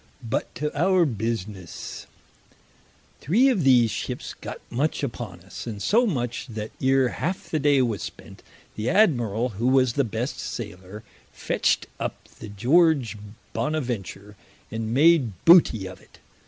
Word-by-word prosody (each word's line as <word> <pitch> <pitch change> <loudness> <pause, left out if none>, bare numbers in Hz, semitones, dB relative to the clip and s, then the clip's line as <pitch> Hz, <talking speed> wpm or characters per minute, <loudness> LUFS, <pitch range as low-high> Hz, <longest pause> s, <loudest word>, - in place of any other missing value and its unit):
But 110 - -2
to 150 0 -3
our 180 +3 +3
businesse. 110 - -5 1.1
Three 230 - +3
of 210 - +1
these 125 -4 +5
ships - - -5
got - - -8
much 145 +6 -1
upon 115 -9 -5
us, 95 +6 -9
and 105 -3 -5
so 235 - +3
much 125 - -2
that 110 -2 -6
ere 130 -1 +3
halfe 180 +9 -4
the 155 - +1
day 140 -2 +4
was 110 -7 -2
spent, - - -9 0.3
the 110 +2 -3
Admirall 125 - +2
who 120 - +1
was 130 -2 +3
the 140 - +2
best 115 +3 -3
sailer, 105 -2 -7 0.3
fetcht - - 0
up - - -5
the 110 - -8
George 130 - +3 0.4
Bonaventure, 115 - -3 0.4
and 110 0 -3
made 140 -3 +4
booty 165 - +6
of 95 - -9
it. - - -21
120 Hz, 140 wpm, -25 LUFS, 110-150 Hz, 1.1 s, booty